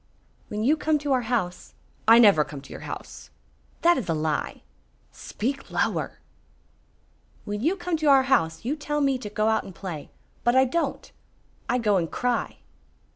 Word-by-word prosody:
"When 210 0 -3
you 295 +7 +3
come 310 0 +1
to 290 -1 -3
our 255 - +2
house 185 -8 -2
" - - -35 0.2
"I 225 +1 +9
never 205 -10 +6
come 145 -1 -9
to - - -15
your - - -7
house." - - -8 0.5
"That 345 -3 +5
is 205 - -6
a 165 - +1
lie." 155 -1 -2 0.5
"Speak 270 +5 -4
lower!" - - -1 1.3
"When 205 0 -4
you 330 +9 +2
come 350 -3 -2
to 310 -1 -1
our 270 -2 +6
house 165 -10 +1
you 275 +5 0
tell 295 0 -2
me 275 -2 +2
to 210 - -6
go 215 +1 0
out 220 - +1
and 190 - -11
play. 170 -7 -7 0.3
But 240 +1 +3
I 260 0 +6
don't. 335 +7 -2 0.6
I 245 - +2
go 210 -5 +2
and 165 -3 -1
cry." 245 -1 -1
240 Hz, 180 wpm, -25 LUFS, 195-285 Hz, 1.3 s, I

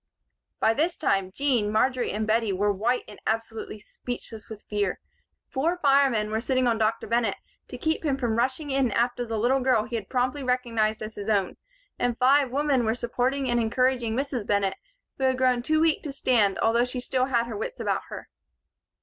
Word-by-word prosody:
By 220 - +3
this 330 +8 0
time, 195 -10 +1
Jean, 240 -4 +1
Marjory 250 +3 +1
and 215 +1 -2
Bettie 220 -1 +1
were 205 +2 +1
white 235 +6 0
and 210 - -12
absolutely 225 -1 -3
speechless 225 +1 -8
with 215 -2 -9
fear. 205 -3 -2 0.5
Four 325 +7 0
firemen 275 -8 +3
were 220 +1 0
sitting 255 +1 +1
on 230 -2 +1
Dr. 220 +1 0
Bennett 230 +1 +1 0.3
to - - -8
keep 320 -4 -1
him 280 -4 0
from 240 -4 -1
rushing 260 +5 -1
in 270 -2 +2
after 240 +2 0
the 225 -1 -2
little 245 +5 +2
girl 255 -4 +2
he 235 - -6
had 215 -4 -5
promptly 255 +2 0
recognized 230 -4 0
as 215 +1 -6
his 205 +1 -6
own, 200 -3 +1 0.4
and 245 -1 0
five 270 +2 +4
women 275 -1 +1
were 220 0 +1
supporting 250 +3 -1
and 240 -1 +1
encouraging 240 0 +1
Mrs. 265 -5 -2
Bennett, 200 -2 +1 0.5
who 265 - +1
had 260 -1 +2
grown 255 -2 +2
too 310 +5 +1
weak 320 -1 +2
to 295 - -5
stand 225 -7 +2
although 230 +2 +3
she 250 0 -5
still 255 +1 0
had 240 -3 +1
her 235 - -6
wits 485 +4 -5
about - - 0
her. - - -8
245 Hz, 195 wpm, -26 LUFS, 220-265 Hz, 0.5 s, five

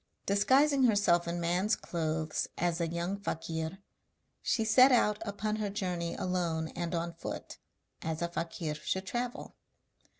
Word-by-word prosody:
Disguising 265 +7 +4
herself 200 -6 +3
in 170 +1 -2
man's 180 +6 +1
clothes 160 -2 -2
as 175 0 0
a 170 - +1
young 170 +4 -2
fakir, 165 -2 -3 0.6
she 225 -3 +1
set 255 +5 +7
out 210 -4 +3
upon 210 +1 -2
her 210 -2 -1
journey 180 -4 -2
alone 170 -3 -1
and 170 0 -3
on 170 0 -2
foot, 165 - -7 0.4
as 160 +1 -2
a - - +1
fakir 165 -2 -3
should 190 +5 -3
travel. 245 +4 -4
175 Hz, 140 wpm, -31 LUFS, 165-210 Hz, 0.6 s, set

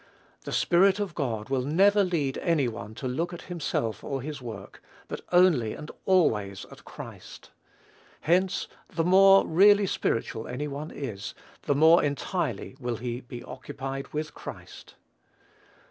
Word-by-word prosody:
The - - -5
Spirit 190 +3 +3
of 200 -4 -3
God 120 -8 -3
will 135 -1 +1
never 195 +9 +4
lead 155 -8 -1
any 160 -6 +1
one 110 -2 -7
to 130 - -4
look 165 +8 -2
at 175 - -8
himself 130 - -3
or 135 -3 -3
his 150 -2 -6
work; 110 -5 -9 0.3
but - - -6
only 175 -12 +4
and 150 - -8 0.2
always 105 - +2
at - - -14
Christ. - - -11 0.7
Hence, 185 +3 +1 0.2
the 165 - -1
more 195 +2 +6
really 200 +4 +5
spiritual 115 -9 -2
any 140 +4 -4
one 145 +2 -6
is, 115 -9 -6 0.3
the 145 - +3
more 160 +4 +6
entirely 145 - -2
will 120 -2 -2
he 120 +1 -4
be 120 -1 -9
occupied 135 -1 -6
with 155 0 -4
Christ. - - -10
145 Hz, 145 wpm, -27 LUFS, 125-175 Hz, 0.7 s, more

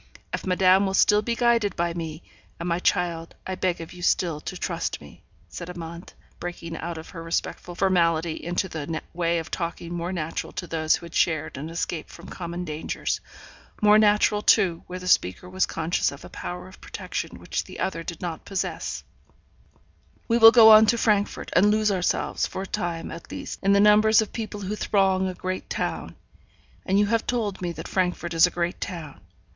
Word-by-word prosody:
If - - -3
madame 185 +1 +4
will 190 - -1
still 210 +1 +5
be 235 +2 -2
guided 235 -5 +2
by 170 0 0
me 165 -1 -6 0.4
and, 170 - -4
my 170 0 0
child, 170 -2 0
I 190 - -3
beg 185 -1 -1
of 165 - -9
you 180 - -11
still 170 -3 +1
to 185 - -6
trust 170 -2 -3
me,' 75 -1 -15 0.3
said 165 - -8
Amante, 170 -1 -8 0.2
breaking 170 -1 -6
out 170 0 -5
of 160 - -9
her 165 - -8
respectful 165 +1 -3
formality 170 -3 +2
into 175 +2 -1
the 160 -1 -4
way 170 0 +1
of 165 - -5
talking 170 0 -4
more 175 +1 -3
natural 165 -3 -4
to 185 - -4
those 160 -2 +1
who - - -8
had 170 - -12
shared 155 -2 +1
and 150 +4 -6
escaped 165 -1 -4
from 170 - -12
common 175 0 -5
dangers 155 -1 -3 0.6
more 210 0 +6
natural, 210 0 +4
too, 185 -6 +3
where 180 - -6
the 180 0 -7
speaker 95 - +2
was 185 +1 0
conscious 165 +1 0
of 140 - -11
a - - -10
power 180 +1 -6
of 185 - -15
protection 415 +2 -5
which - - -3
the - - -10
other 190 - -2
did 165 0 -7
not 165 -3 -4
possess 195 -2 -3 1.2
'we 230 0 +2
will 225 0 +11
go 225 -2 +9
on 215 0 +9
to 235 - +3
Frankfort, 210 -3 0
and 195 +4 +6
lose 215 0 +2
ourselves, 185 -3 0
for 190 - -5
a - - -5
time, 170 -3 -3
at 165 - -9
least, - - -6
in 195 0 +3
the 200 - +5
numbers 210 +1 +6
of 220 - -1
people 215 -2 -5
who 200 +2 -3
throng 190 -3 +2
a 185 - -4
great 185 +1 -4
town; - - -3 0.7
and 190 - +3
you 205 - +4
have 225 +2 0
told 220 -6 -1
me 175 -1 -2
that 160 -1 -7
Frankfort 180 -2 -1
is 165 +2 +6
a - - -3
great 175 0 -3
town. 160 - -6
180 Hz, 200 wpm, -25 LUFS, 165-200 Hz, 1.2 s, will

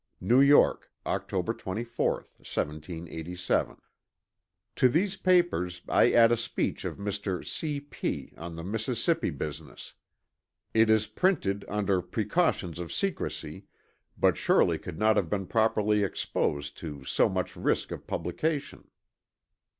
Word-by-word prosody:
NEW 125 +3 +4
YORK, 140 +1 +5 0.2
Octr. - - -1
24, 115 +5 -1 0.3
1787. 80 +3 -3 1.0
"To 130 - +5
these 185 +8 +1
papers 175 - +2
I - - +4
add 115 0 +6
a - - +5
speech 115 0 -2
of - - -4
Mr. 100 -2 -3
C. 150 -3 -2
P. 145 +1 -5
on 85 +1 -7
the 85 - -6
Mississippi 115 - 0
business. 75 -1 -7 0.8
It 110 0 +4
is 110 -1 +4
printed 125 - 0
under 100 -3 0
precautions 105 - 0
of 85 -1 -5
secrecy, 195 -3 -3 0.5
but - - +3
surely - - +3
could 85 -3 -8
not 110 0 +3
have 90 -6 +1
been 100 -2 -1
properly 105 0 +2
exposed 70 -6 -2
to 75 -4 -7
so - - +2
much - - -2
risk - - 0
of - - -7
publication." 140 - -3
105 Hz, 125 wpm, -28 LUFS, 90-125 Hz, 1.0 s, add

